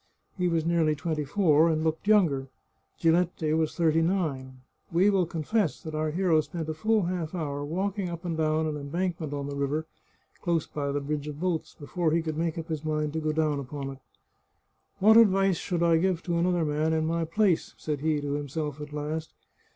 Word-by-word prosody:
He 180 -2 0
was 165 -2 0
nearly 165 -2 +2
twenty 155 0 -2
four, 160 -1 +4
and 155 -1 0
looked 160 +4 -1
younger. 165 -11 +3 0.5
Giletti 165 -1 +2
was 160 -1 0
thirty 165 -2 +3
nine. 140 -8 -1 0.3
We 185 +5 +4
will 185 -4 +2
confess 170 +3 -1
that 160 - -6
our 155 0 0
hero 165 -1 +2
spent 155 +2 -6
a - - -1
full 215 +6 +1
half 175 -1 -3
hour 145 -4 -3
walking 190 +5 -2
up 170 +1 -7
and 170 -2 -1
down 155 0 +1
an 155 -1 -2
embankment 165 +2 -3
on 140 -1 -3
the 140 - -5
river, 140 +3 -1 0.6
close 170 -3 0
by 140 -1 -3
the 145 0 -1
bridge 145 +1 -3
of 150 -1 -6
boats, 175 -2 -2
before 160 +2 -1
he 165 0 +2
could 155 -1 -3
make 165 0 -1
up 165 +1 -6
his 155 -1 -3
mind 150 -1 -1
to 160 - -1
go 155 -1 0
down 155 -2 +1
upon 140 0 -5
it. 135 - -11 0.5
" - - -46
What 220 +3 +7
advice 195 -4 +5
should 175 -3 -1
I 165 -1 +4
give 185 -1 0
to 170 -2 0
another 175 -1 +2
man 155 +2 0
in 160 0 +1
my 165 +1 0
place? 175 +1 +1
" - - -37
said 150 -2 -3
he 155 0 +1
to 145 0 -2
himself 145 +1 -3
at 150 0 -7
last. 155 +2 -4
160 Hz, 210 wpm, -27 LUFS, 150-175 Hz, 0.6 s, What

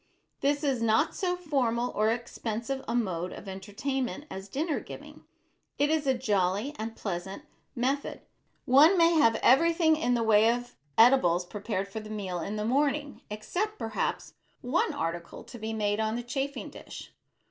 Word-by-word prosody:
This 285 +1 +1
is 270 -5 0
not 225 -1 +2
so 360 -2 -1
formal 255 -8 0
or 215 +1 +1
expensive 235 +2 -3
a 230 - -1
mode 185 -6 -1
of 200 - -10
entertainment 240 +9 -4
as 190 +1 -7
dinner 300 - -1
giving. - - -11 0.5
It 290 +2 +2
is 310 -3 0
a 265 - +3
jolly 205 +3 0
and 225 +1 -4
pleasant 190 +5 -5 0.3
method. 265 +3 -1 0.4
One 300 +9 +6
may 335 0 +5
have 230 -9 +4
everything 325 +4 +5
in 245 -6 +1
the 235 - +1
way 220 0 +5
of 245 0 -4 0.2
edibles 205 -8 +5
prepared 200 0 -3
for 200 +2 -6
the 215 0 -10
meal 195 -5 -4
in 200 +6 -4
the 210 0 -2
morning 285 +3 0
except 360 - -3
perhaps 225 -1 -3 0.3
one 280 +7 +1
article 170 - -4
to 240 - -11
be 220 +1 -4
made 210 -1 0
on 220 0 0
the 240 - -3
chafing 275 +3 -4
dish. - - -10
235 Hz, 165 wpm, -28 LUFS, 210-280 Hz, 0.5 s, One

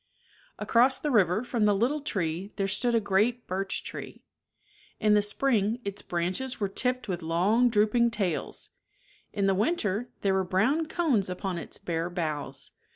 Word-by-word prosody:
Across 250 +3 +3
the 300 - -2
river 205 -2 +3
from 235 -3 0
the 205 -1 +4
little 255 +9 0
tree 185 - -3
there 195 -1 -1
stood 240 +4 +1
a - - +4
great 215 +4 +1
birch 190 +1 -3
tree. - - -8 0.8
In 215 -1 +3
the 210 - +5
spring 220 0 +1
its 200 0 -4
branches 185 +10 -2
were 200 -2 -1
tipped 250 +4 -1
with 180 -3 -3
long 190 +10 +2
drooping 230 +2 +3
tails, 200 -7 -3 0.6
in 200 - -1
the 195 - +3
winter 215 - 0
there 195 -1 +2
were 190 0 +2
brown 225 - +1
cones 280 - +1
upon 180 -1 -3
its - - -7
bare 165 0 -3
boughs. 155 -6 -4
205 Hz, 160 wpm, -28 LUFS, 185-240 Hz, 0.8 s, the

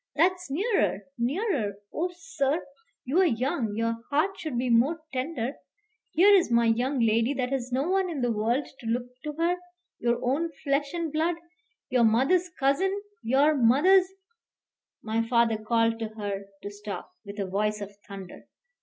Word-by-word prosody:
That's 360 -1 +2
nearer, 275 - +1 0.2
nearer! 255 - 0 0.2
Oh, 350 +3 -1
sir! 320 -2 -1 0.4
you're 320 +9 +3
young; 245 - 0
your 230 +1 0
heart 305 +7 +2
should 305 -7 -4
be 245 0 0
more 265 +9 +3
tender. 260 -1 -3 0.5
Here 390 +6 +5
is 375 -8 +5
my 235 0 +3
young 245 +4 +1
lady 230 +4 +2
that 255 -1 -2
has 255 -2 -2
no 265 +5 0
one 380 0 +1
in 305 -6 -3
the 245 -1 +1
world 230 +6 0
to 230 - -8
look 240 +2 0 0.2
to 300 - -3
her. 335 +3 +1 0.4
Your 240 0 +1
own 295 +7 +1
flesh 280 0 0
and 330 -3 -3
blood; 325 +2 +1 0.6
your 250 -2 +4
mother's 270 +11 +3
cousin, 350 +7 +1 0.2
your 275 +6 +3
mother's 295 +9 +5 0.5
" - - -55
My 220 +1 0
father 230 -1 +2
called 230 +1 +1
to 225 - -2
her 200 -2 -4 0.2
to 205 - -5
stop, 205 -1 -7
with 200 -1 -9
a 200 - 0
voice 210 +3 -1
of 200 0 -8
thunder. 195 -3 -10
255 Hz, 165 wpm, -27 LUFS, 225-320 Hz, 0.6 s, Here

